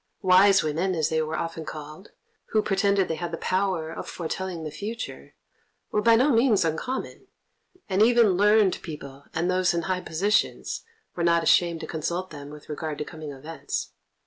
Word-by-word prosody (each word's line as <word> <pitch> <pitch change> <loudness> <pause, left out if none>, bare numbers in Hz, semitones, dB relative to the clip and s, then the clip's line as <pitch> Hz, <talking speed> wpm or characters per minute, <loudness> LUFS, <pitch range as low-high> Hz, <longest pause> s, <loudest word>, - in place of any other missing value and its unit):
"Wise 190 +1 +6
women," 165 +5 0
as 155 -2 +1
they 160 0 +1
were 155 0 -2
often 165 -1 -4
called, 155 +5 -9 0.4
who 215 -1 +1
pretended 200 -1 +2
they 160 - -2
had 175 - -2
the 165 - -3
power 185 -4 -1
of - - -7
foretelling 175 0 -4
the 155 - -5
future, 215 +9 -7 0.6
were 210 - +1
by 230 +1 +6
no 260 +6 +4
means 230 -6 +4
uncommon, 165 +12 -3 0.6
and 195 +1 +1
even 235 -2 +5
learned 205 +1 +3
people 140 -4 -9
and 165 +2 0
those 185 -1 +2
in 170 - -1
high 185 0 -1
positions 195 +7 0 0.3
were 175 - -3
not 170 0 +3
ashamed 170 0 +3
to - - -4
consult 175 +3 -3
them 145 -1 -9
with 150 0 -12
regard 150 0 -4
to 150 - -4
coming 155 -2 -8
events. 140 +1 -5
175 Hz, 175 wpm, -26 LUFS, 160-200 Hz, 0.6 s, Wise